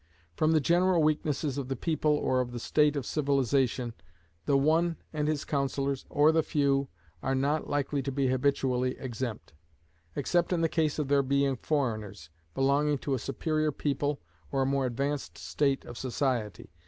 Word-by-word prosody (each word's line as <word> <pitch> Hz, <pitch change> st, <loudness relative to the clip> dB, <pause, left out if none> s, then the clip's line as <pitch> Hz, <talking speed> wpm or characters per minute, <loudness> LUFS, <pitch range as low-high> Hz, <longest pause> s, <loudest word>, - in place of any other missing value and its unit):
From 155 Hz, -, +2 dB
the 160 Hz, -, +4 dB
general 175 Hz, +3 st, +3 dB
weaknesses 150 Hz, -2 st, 0 dB
of 135 Hz, -, -4 dB
the 135 Hz, -, -2 dB
people 155 Hz, +3 st, 0 dB
or 130 Hz, -3 st, +1 dB
of 120 Hz, -1 st, -5 dB
the 120 Hz, -, -4 dB
state 150 Hz, +4 st, +2 dB
of 140 Hz, -3 st, -2 dB
civilization, 135 Hz, -4 st, +1 dB, 0.5 s
the 140 Hz, -, +4 dB
One 165 Hz, +4 st, +2 dB, 0.2 s
and 150 Hz, -1 st, -1 dB
his 155 Hz, -2 st, -1 dB
councillors, 140 Hz, -1 st, -1 dB
or 150 Hz, +2 st, +4 dB
the 160 Hz, 0 st, +3 dB
Few, 140 Hz, -2 st, +1 dB, 0.3 s
are 135 Hz, -, 0 dB
not 145 Hz, +3 st, 0 dB
likely 145 Hz, 0 st, 0 dB
to 135 Hz, +1 st, -3 dB
be 135 Hz, 0 st, 0 dB
habitually 130 Hz, -1 st, +1 dB
exempt; 120 Hz, -7 st, -5 dB, 0.6 s
except 175 Hz, +5 st, +1 dB
in 170 Hz, -, +1 dB
the 165 Hz, -, +3 dB
case 155 Hz, -2 st, 0 dB
of 150 Hz, -3 st, -1 dB
their 140 Hz, 0 st, +4 dB
being 140 Hz, 0 st, +1 dB
foreigners, 110 Hz, -, -2 dB, 0.2 s
belonging 140 Hz, +2 st, +2 dB
to 140 Hz, -, -3 dB
a 130 Hz, -, 0 dB
superior 155 Hz, +4 st, -1 dB
people 145 Hz, 0 st, -1 dB, 0.3 s
or 135 Hz, -1 st, +1 dB
a -, -, 0 dB
more 135 Hz, -1 st, +1 dB
advanced 140 Hz, +4 st, -3 dB
state 140 Hz, -2 st, 0 dB
of 120 Hz, -, -8 dB
society. 120 Hz, -, -2 dB
140 Hz, 170 wpm, -29 LUFS, 130-150 Hz, 0.6 s, the